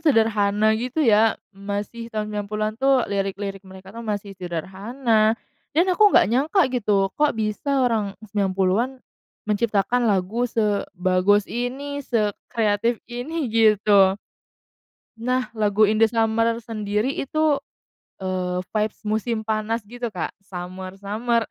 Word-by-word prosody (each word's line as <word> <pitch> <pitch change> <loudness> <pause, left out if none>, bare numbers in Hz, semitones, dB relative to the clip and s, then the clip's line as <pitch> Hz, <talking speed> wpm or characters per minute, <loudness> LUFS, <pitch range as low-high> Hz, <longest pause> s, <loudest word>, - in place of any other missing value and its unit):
sederhana 220 -7 +3
gitu 250 +6 -2
ya 220 -1 +4 0.2
masih 205 +4 -5
tahun 215 -2 -3
90-an 210 +1 -2
tuh 270 -2 +4
lirik-lirik 195 0 -3
mereka 190 0 -13
tuh 230 - -8
masih 205 -2 -3
sederhana 215 - 0 0.4
dan 340 - +5
aku 420 +3 +6
nggak - - +5
nyangka 305 - +3
gitu 205 -5 +2
kok 300 0 +3
bisa 250 +5 0
orang 215 -4 0
90-an 195 +2 +1 0.6
menciptakan 215 +3 +1
lagu 205 +4 +1
sebagus 200 -2 +1
ini 270 +4 -3
sekreatif 225 -1 0
ini 265 +5 -3
gitu. 210 -3 +5 1.0
Nah, 250 +2 -1
lagu 210 0 +3
In 215 - +1
The 225 +1 +5
Summer 230 0 +1
sendiri 215 +1 -2
itu, 310 +1 +1 0.7
eee, 185 -1 -2
vibes 215 0 -1
musim 220 +1 -1
panas 220 +1 -1
gitu, 240 +3 -5
Kak, 180 -5 -4
summer-summer 195 +5 -3
215 Hz, 115 wpm, -23 LUFS, 200-240 Hz, 1.0 s, aku